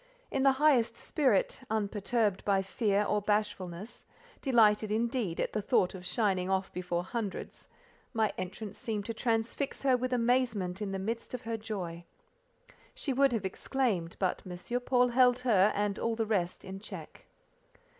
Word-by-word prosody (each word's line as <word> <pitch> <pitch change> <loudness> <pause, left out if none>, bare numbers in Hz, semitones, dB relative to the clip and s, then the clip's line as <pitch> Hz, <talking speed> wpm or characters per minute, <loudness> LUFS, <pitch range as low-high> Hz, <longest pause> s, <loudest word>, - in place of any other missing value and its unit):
In 270 - 0
the 270 0 +5
highest 265 -5 +3
spirit, 260 -10 +1
unperturbed 210 -1 0
by 195 -1 +2
fear 200 +1 +1
or 210 0 +1
bashfulness, 205 -2 -2 0.4
delighted 215 -5 +4
indeed 230 -5 -1
at - - -1
the 215 - 0
thought 200 -4 +2
of 185 -1 -7
shining 190 -5 +1
off 190 0 0
before 175 -1 -2
hundreds—my 225 - -4
entrance 190 +3 -6
seemed 215 -5 -3
to 230 - -3
transfix 230 +5 -1
her 265 -2 +4
with 255 +1 -2
amazement 230 -6 +1
in 205 -2 -2
the 195 - -2
midst 230 +6 -3
of 250 - -8
her 230 0 -2
joy. 190 -6 -5 0.9
She 310 - -1
would 275 +1 +4
have 220 -5 -1
exclaimed, 190 -4 -1
but 185 -2 0
M. 185 +7 -4
Paul 250 0 +3
held 250 0 +4
her 210 -5 +4
and 205 -1 0
all 230 -1 0
the 225 0 0
rest 185 -5 -1
in 190 0 -7
check. 210 - -9
215 Hz, 155 wpm, -31 LUFS, 195-245 Hz, 0.9 s, the